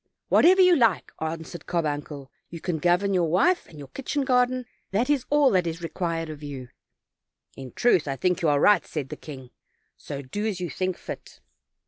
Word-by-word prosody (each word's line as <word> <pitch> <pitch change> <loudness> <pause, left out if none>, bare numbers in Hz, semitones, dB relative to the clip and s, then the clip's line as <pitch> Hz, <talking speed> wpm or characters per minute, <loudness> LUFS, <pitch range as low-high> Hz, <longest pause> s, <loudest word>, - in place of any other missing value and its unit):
"Whatever 375 +3 +6
you 365 -1 +6
like," 230 - +2
answered 160 +1 -5
Carbuncle; 145 -4 -3 0.2
"you 165 - -8
can 170 -2 -3
govern 180 +4 +2
your 175 -3 +2
wife 345 - +2
and 160 - -14
your 140 -2 -10
kitchen 275 +1 -3
garden; 250 -1 +2 0.2
that 235 +8 +1
is 275 -4 +1
all 290 -2 +4
that 180 -3 +2
is 165 +1 -5
required 165 -1 -3
of 155 -1 -8
you." 135 -4 -7 0.9
"In 130 -2 -9
truth, 185 -11 +2
I 135 - -1
think 180 +7 +1
that - - -9
you 165 - +2
are 145 -1 +3
right," 210 +7 +5
said 145 -4 -5
the - - -5
king; 130 -5 -11 0.4
"so 140 0 -7
do 205 +12 -3
as 200 -4 -3
you 175 -2 -4
think 185 -1 -2
fit." - - -9
175 Hz, 195 wpm, -25 LUFS, 150-225 Hz, 0.9 s, Whatever